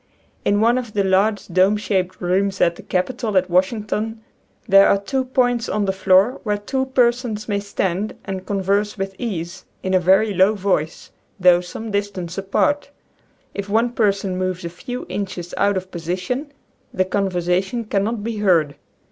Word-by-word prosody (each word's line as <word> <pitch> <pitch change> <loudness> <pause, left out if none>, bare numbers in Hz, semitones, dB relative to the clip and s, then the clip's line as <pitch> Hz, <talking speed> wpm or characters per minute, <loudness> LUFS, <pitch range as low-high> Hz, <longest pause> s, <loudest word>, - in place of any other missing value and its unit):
In 205 +1 +2
one 235 +3 +4
of 240 -4 -7
the 200 - +1
large 195 +2 +2
dome 185 +4 +3
shaped 190 -3 -1
rooms 190 +2 0
at 170 0 +3
the - - -11
capitol 215 +2 -1
at 185 -1 +1
Washington 215 +4 0 0.4
there 195 -1 +7
are - - +4
two 260 +6 -2
points 245 -2 +1
on 210 -1 0
the 190 - +1
floor 190 +5 +3
where 210 -2 -1
two 265 +6 -2
persons 240 -4 +1
may 205 -2 0
stand 200 0 -2
and 190 -1 -4
converse 200 +1 0
with 195 0 -3
ease, 185 -6 -4 0.2
in 190 - -1
a 185 - +5
very 195 +4 +3
low 190 +3 +4
voice, 185 -5 -2 0.3
though 180 -1 +5
some 220 +5 -7
distance 200 -4 -3
apart. 285 +10 0 0.6
If 200 0 -5
one 230 +3 +2
person 200 -5 0
moves 185 -1 -2
a - - -3
few 245 +9 -7
inches 185 -3 -5
out 200 -1 +2
of 185 0 -6
position 185 - -3 0.4
the 185 - 0
conversation 190 +3 -1
cannot 210 +1 -1
be 225 0 -3
heard. 170 -8 +2
200 Hz, 165 wpm, -21 LUFS, 185-220 Hz, 0.6 s, there